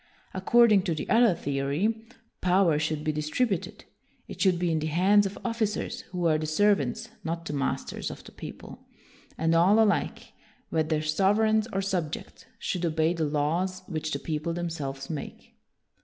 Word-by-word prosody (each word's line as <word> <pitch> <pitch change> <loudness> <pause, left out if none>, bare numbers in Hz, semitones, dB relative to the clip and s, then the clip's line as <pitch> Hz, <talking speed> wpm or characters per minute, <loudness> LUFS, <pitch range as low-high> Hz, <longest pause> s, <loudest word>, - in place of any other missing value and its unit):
According 215 +2 +5
to 170 -4 0
the 150 - -5
other 230 -5 +5
theory, 150 +13 -1 0.3
power 180 -4 +3
should 155 -1 -2
be 155 - +1
distributed; 155 +7 -2 0.4
it - - -8
should 185 -3 +4
be 175 -1 0
in 160 - +1
the 155 - -2
hands 195 +6 +4
of 195 - -8
officers 230 -3 -2
who 180 -2 -3
are 155 -2 +3
the 155 - -3
serv 205 +6 +3
ants, 220 0 -4
not 165 +1 -4
the - - -4
masters, 140 -1 -2
of - - -9
the - - -13
people; - - -10 0.5
and 160 +1 +1
all 180 +6 +5
alike, 215 -2 +1 0.4
whether 155 -1 0
sovereigns 210 +7 +2
or 195 0 -1
subjects, 175 -6 -4
should 180 -2 -3
obey 160 0 +1
the 165 -2 -1
law 150 +2 0
r - - +1
s 185 0 -7
which 155 -2 -3
the 140 - 0
people 155 +3 -3
themselves 145 -6 -4
make. 155 -3 -7
170 Hz, 170 wpm, -27 LUFS, 155-200 Hz, 0.5 s, According